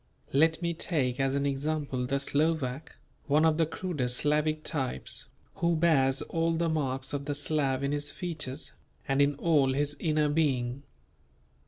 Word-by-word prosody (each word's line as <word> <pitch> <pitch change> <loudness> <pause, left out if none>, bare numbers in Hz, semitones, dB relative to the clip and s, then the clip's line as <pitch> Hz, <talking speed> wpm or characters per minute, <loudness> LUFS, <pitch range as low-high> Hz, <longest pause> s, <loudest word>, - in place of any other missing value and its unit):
Let 160 +4 +3
me 170 0 0
take 145 -6 -1
as 135 0 +1
an 140 0 0
example 140 -2 -1
the 140 +2 0
Slovak, 145 -1 -1 0.3
one 150 +2 +4
of 160 0 +3
the 165 - +3
crudest 150 -9 -1
Slavic 150 +1 +1
types, 135 - -3 0.3
who 170 0 +2
bears 140 -5 +3
all 165 0 0
the 165 0 0
marks 135 -4 -1
of 140 -1 -3
the 145 0 -2
Slav 140 -3 0
in 140 - 0
his 145 0 -1
features 155 -6 -4 0.4
and 135 +1 +2
in 145 0 +3
all 145 -3 +2
his 145 +1 +1
inner 155 -2 +1
being. 135 -4 0
145 Hz, 160 wpm, -29 LUFS, 135-160 Hz, 0.4 s, one